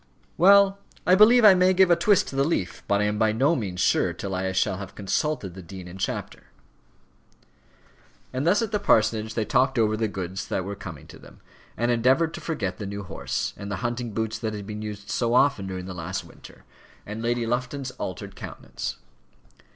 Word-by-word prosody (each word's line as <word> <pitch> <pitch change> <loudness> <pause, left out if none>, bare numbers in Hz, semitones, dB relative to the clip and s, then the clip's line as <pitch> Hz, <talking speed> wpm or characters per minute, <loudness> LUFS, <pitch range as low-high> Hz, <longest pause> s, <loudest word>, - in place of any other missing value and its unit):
"Well 200 +2 +6 0.3
I 180 - +5
believe 220 +4 +7
I 205 - +10
may 185 0 +3
give 190 -1 +5
a - - +7
twist 205 0 +3
to - - -8
the 135 - +3
leaf; 140 - -2
but 100 0 +2
I - - +2
am 105 0 -1
by 110 -1 +3
no 135 +9 +2
means 95 - -3
sure - - +2
till 100 -1 -5
I 95 0 -1
shall 95 0 0
have 100 -1 -8
consulted 100 - -2
the 95 - -9
dean 90 +1 -10
in 90 +2 -10
chapter." - - -4 1.9
And 130 +5 -1
thus 205 +6 +4
at 225 - -4
the 210 - 0
parsonage 110 - +2
they 110 - 0
talked 130 +3 +2
over 110 -2 +2
the 110 0 0
good 95 -3 -5
things 95 0 -5
that 95 - -2
were 100 - -4
coming 85 -7 -9
to - - -14
them, - - -16 0.4
and 120 +2 +1
endeavoured 130 +7 +2
to - - -7
forget 100 - -3
the 105 - -4
new 100 0 -5
horse, 90 - -3
and 100 - -7
the - - -1
hunting 120 0 -2
boots 110 +1 -3
that 110 -2 -3
had 100 -1 -7
been 105 +1 -6
used 105 -1 -7
so 120 0 +1
often 125 -8 +3
during 95 -1 -5
the 95 - -6
last 90 +2 -5
winter, - - -15 0.4
and 105 +2 -6
Lady 120 0 0
Lufton's 125 +3 -2
altered 90 - -6
countenance. - - -6
110 Hz, 210 wpm, -25 LUFS, 95-140 Hz, 1.9 s, I